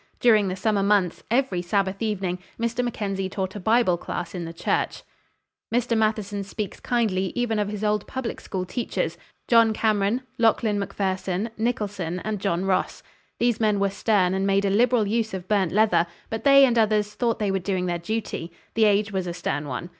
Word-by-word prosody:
During 215 Hz, -4 st, +4 dB
the 185 Hz, -, -2 dB
summer 205 Hz, +1 st, +1 dB
months, 195 Hz, -3 st, +2 dB
every 235 Hz, -7 st, +1 dB
Sabbath 195 Hz, +2 st, -1 dB
evening, 195 Hz, -5 st, -1 dB, 0.2 s
Mr. 235 Hz, +1 st, 0 dB
Mackenzie 195 Hz, -5 st, -2 dB
taught 190 Hz, 0 st, -4 dB
a -, -, -4 dB
Bible 220 Hz, -3 st, +3 dB
class 170 Hz, -1 st, -5 dB
in 175 Hz, -2 st, -4 dB
the 165 Hz, -, -6 dB
church." 170 Hz, -, -1 dB, 0.7 s
Mr. 240 Hz, 0 st, +1 dB
Matheson 215 Hz, -2 st, 0 dB
speaks 200 Hz, 0 st, -5 dB
kindly 205 Hz, -7 st, 0 dB
even 240 Hz, -3 st, 0 dB
of 205 Hz, -, 0 dB
his 210 Hz, 0 st, -5 dB
old 210 Hz, -1 st, 0 dB
public 260 Hz, -3 st, -4 dB
school 185 Hz, -2 st, -4 dB
teachers—John 230 Hz, +1 st, 0 dB
Cameron, 215 Hz, +3 st, +1 dB, 0.2 s
Lachlan 220 Hz, -2 st, +2 dB
Macpherson, 195 Hz, +1 st, -2 dB
Nicholson, 205 Hz, -6 st, -2 dB
and 215 Hz, +2 st, -3 dB
John 185 Hz, -2 st, -1 dB
Ross. 190 Hz, -1 st, -1 dB, 0.3 s
"These 240 Hz, -2 st, +1 dB
men 210 Hz, -2 st, +2 dB
were 200 Hz, 0 st, +1 dB
stern, 200 Hz, -3 st, +2 dB
and 190 Hz, +1 st, 0 dB
made 195 Hz, 0 st, +2 dB
a 195 Hz, -, +1 dB
liberal 230 Hz, +1 st, +3 dB
use 220 Hz, 0 st, -1 dB
of 185 Hz, -1 st, -7 dB
burnt 195 Hz, -5 st, +1 dB
leather; 185 Hz, -5 st, +3 dB, 0.2 s
but 225 Hz, 0 st, -4 dB
they 275 Hz, 0 st, +8 dB
and 240 Hz, -3 st, +2 dB
others 210 Hz, -1 st, +2 dB
thought 235 Hz, -2 st, 0 dB
they 210 Hz, -3 st, 0 dB
were 195 Hz, -, 0 dB
doing 185 Hz, 0 st, -1 dB
their 175 Hz, -1 st, -1 dB
duty. 205 Hz, -3 st, -4 dB, 0.2 s
The 225 Hz, -1 st, +4 dB
age 210 Hz, 0 st, +2 dB
was 190 Hz, -2 st, -2 dB
a 170 Hz, -, -4 dB
stern 150 Hz, -4 st, -3 dB
one. 135 Hz, +6 st, -4 dB
205 Hz, 185 wpm, -24 LUFS, 190-225 Hz, 0.7 s, they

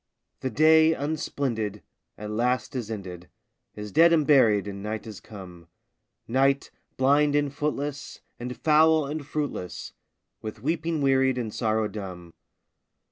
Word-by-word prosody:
The 130 Hz, -, -2 dB
day, 160 Hz, +5 st, +5 dB
unsplendid, 130 Hz, -8 st, -3 dB, 0.3 s
at 105 Hz, 0 st, -6 dB
last 125 Hz, +4 st, -1 dB
is 120 Hz, -4 st, -4 dB
ended, 90 Hz, -5 st, -7 dB, 0.5 s
Is 105 Hz, -1 st, -7 dB
dead 165 Hz, -, +6 dB
and 155 Hz, -3 st, +3 dB
buried, 110 Hz, -9 st, +4 dB
and 100 Hz, -1 st, -6 dB
night 105 Hz, +2 st, -4 dB
has 110 Hz, -3 st, -8 dB
come; 90 Hz, -5 st, -12 dB, 0.6 s
Night, 135 Hz, +3 st, +1 dB, 0.3 s
blind 145 Hz, +2 st, +3 dB
and 145 Hz, -1 st, +1 dB
footless, 145 Hz, -1 st, -4 dB, 0.2 s
and 125 Hz, +1 st, -6 dB
foul 155 Hz, 0 st, +4 dB
and 150 Hz, +2 st, -4 dB
fruitless, 135 Hz, -, -5 dB, 0.5 s
With 110 Hz, 0 st, -8 dB
weeping 160 Hz, 0 st, -1 dB
wearied, 135 Hz, -1 st, +3 dB
and 115 Hz, -4 st, -3 dB
sorrow 110 Hz, -2 st, 0 dB
dumb. 90 Hz, -5 st, -8 dB
130 Hz, 135 wpm, -26 LUFS, 105-145 Hz, 0.6 s, dead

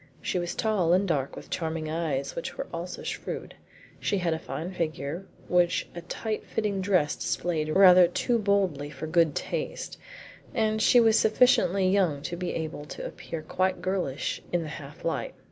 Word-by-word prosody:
She 180 Hz, -, -1 dB
was 175 Hz, 0 st, -3 dB
tall 200 Hz, -7 st, +2 dB
and 190 Hz, +2 st, +3 dB
dark, 140 Hz, -6 st, -1 dB
with -, -, -11 dB
charming 160 Hz, -2 st, -2 dB
eyes 155 Hz, -4 st, -2 dB
which 170 Hz, -, -5 dB
were -, -, -3 dB
also 170 Hz, +2 st, -5 dB
shrewd; -, -, -5 dB, 0.5 s
she 205 Hz, -, 0 dB
had 175 Hz, -3 st, +1 dB
a 160 Hz, -, -3 dB
fine 160 Hz, +4 st, -5 dB
figure 165 Hz, 0 st, -3 dB, 0.2 s
which 175 Hz, -1 st, +2 dB
a 170 Hz, -, -6 dB
tight 215 Hz, +5 st, -4 dB
fitting 205 Hz, -3 st, -1 dB
dress 180 Hz, -7 st, +2 dB
displayed 160 Hz, -3 st, -1 dB
rather 180 Hz, +1 st, +8 dB
too 235 Hz, +7 st, 0 dB
boldly 195 Hz, -9 st, +1 dB
for 150 Hz, +1 st, -6 dB
good 160 Hz, -2 st, +3 dB
taste, -, -, -4 dB, 0.6 s
and 220 Hz, -1 st, +1 dB
she 245 Hz, -, +6 dB
was 225 Hz, -1 st, +5 dB
sufficiently 210 Hz, -4 st, +4 dB
young 180 Hz, -7 st, +2 dB
to 175 Hz, -, -3 dB
be 180 Hz, 0 st, -3 dB
able 155 Hz, -2 st, -4 dB
to -, -, -7 dB
appear 165 Hz, -2 st, -6 dB
quite 185 Hz, +3 st, 0 dB
girlish 180 Hz, -7 st, -2 dB
in 175 Hz, -1 st, +1 dB
the 155 Hz, -, -6 dB
half 150 Hz, +1 st, -9 dB
light. 165 Hz, -, -2 dB
175 Hz, 175 wpm, -27 LUFS, 155-195 Hz, 0.6 s, rather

